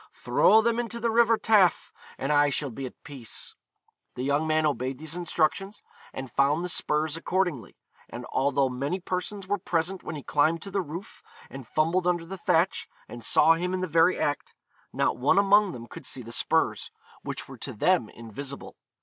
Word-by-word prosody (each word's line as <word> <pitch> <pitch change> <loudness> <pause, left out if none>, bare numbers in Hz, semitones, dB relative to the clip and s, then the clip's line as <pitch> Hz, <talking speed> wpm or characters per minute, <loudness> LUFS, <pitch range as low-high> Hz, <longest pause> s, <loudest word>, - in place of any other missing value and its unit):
Throw 220 +1 +4
them 235 0 +1
into 235 0 -4
the 230 0 0
river 230 0 +4
Taff, 205 -7 +3 0.2
and 140 +2 -1
I 145 0 +4
shall 140 0 -2
be 135 +3 -5
at - - -15
peace.' 135 -8 -6 0.6
The 125 - -4
young 145 +3 +1
man 155 0 +2
obeyed 130 -2 -1
these 160 +2 -4
instructions, 180 +3 -1 0.3
and 130 -2 -7
found 145 +7 +2
the - - -4
spurs 155 -2 0
accordingly; 165 - -2 0.3
and 120 +1 -7
although 140 0 +2
many 140 +8 -3
persons 185 +2 -4
were 205 0 0
present 175 +2 -1
when - - -6
he 145 - -7
climbed 155 +2 +1
to 195 - -8
the 195 0 0
roof 170 +5 -8 0.3
and 135 -3 -9
fumbled 165 +6 +1
under 175 -2 0
the 190 +2 -8
thatch, 170 +2 +1 0.2
and 120 -1 -9
saw 165 - +5
him 180 +3 -2
in 185 - -3
the - - 0
very 165 +2 +3
act, 145 -1 -2 0.4
not - - 0
one 130 +8 +2
among 200 0 +5
them 120 -5 -8
could - - -8
see 130 - -3
the 115 - -9
spurs, - - +1 0.3
which - - -5
were - - -11
to - - -5
them 125 - +1
invisible. 130 +5 -9
160 Hz, 190 wpm, -27 LUFS, 140-185 Hz, 0.6 s, saw